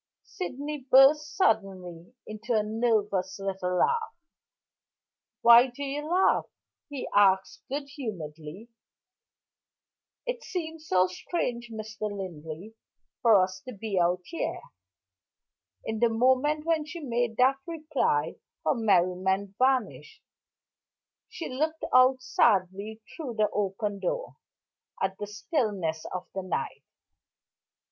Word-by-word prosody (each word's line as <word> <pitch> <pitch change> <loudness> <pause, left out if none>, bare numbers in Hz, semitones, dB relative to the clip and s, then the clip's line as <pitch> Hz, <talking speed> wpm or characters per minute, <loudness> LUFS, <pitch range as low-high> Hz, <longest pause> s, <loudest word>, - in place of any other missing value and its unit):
Sydney 295 -4 -5
burst 290 +3 +6
suddenly 190 - 0
into 225 +2 -3
a 215 - +3
nervous 210 -4 0
little 190 -2 -2
laugh. 455 - +1 1.3
"Why 235 +2 +8
do 255 +3 -8
you 290 +2 -4
laugh?" 370 +2 +3 0.4
he 285 -3 -5
asked 190 -2 +3
good 280 +1 -3
humoredly. 190 - -7 1.6
"It - - -3
seems 320 -5 -6
so 185 0 +4
strange, 240 - -3
Mr. 215 -1 -5
Linley, 180 0 -7 0.5
for 225 -4 +6
us 185 0 -4
to 255 - -6
be 200 -2 -2
out 175 +1 +2
here." 335 - -4 1.2
In 220 0 -3
the 235 0 +4
moment 260 +6 +2
when 325 -2 +1
she 330 +3 -8
made 240 -5 -1
that 260 +2 +4
reply 305 - -1 0.3
her 155 - +3
merriment 190 -1 +1
vanished; 265 - 0 1.1
she 455 -8 -6
looked 310 +5 -2
out 255 0 +5
sadly, 205 0 +1
through 270 -8 -6
the 210 -1 +1
open 200 0 -2
door, - - -3 0.6
at 190 0 -2
the 205 - -4
stillness 205 - -2
of 180 0 -5
the 190 - -3
night. 185 -2 -3
220 Hz, 115 wpm, -28 LUFS, 190-280 Hz, 1.6 s, Why